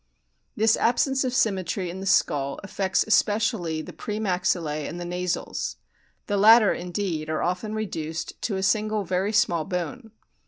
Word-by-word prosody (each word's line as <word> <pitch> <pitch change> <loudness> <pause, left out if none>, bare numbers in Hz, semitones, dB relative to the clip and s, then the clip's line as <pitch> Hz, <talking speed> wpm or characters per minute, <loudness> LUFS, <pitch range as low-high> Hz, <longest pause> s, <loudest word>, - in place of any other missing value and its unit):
This 220 -1 +4
absence 265 +3 +2
of 255 - -1
symmetry 190 -7 0
in 185 - -7
the 195 - -5
skull 140 -6 +1
affects 195 -1 0
especially 210 -6 +1
the - - -10
pre 210 0 -5
maxillse 180 -6 -1
and 175 - -6
the 175 - -5
nasals. 180 0 -3 0.5
The 205 - -1
latter, 220 +1 +7
indeed, 175 -3 -3
are 155 - -1
often 180 +5 -2
reduced 165 -7 -4
to 210 - -1
a 190 - -2
single 215 +1 +1
very 185 +3 -1
small 170 -6 +2
bone. 210 +7 -4
190 Hz, 155 wpm, -25 LUFS, 175-215 Hz, 0.5 s, latter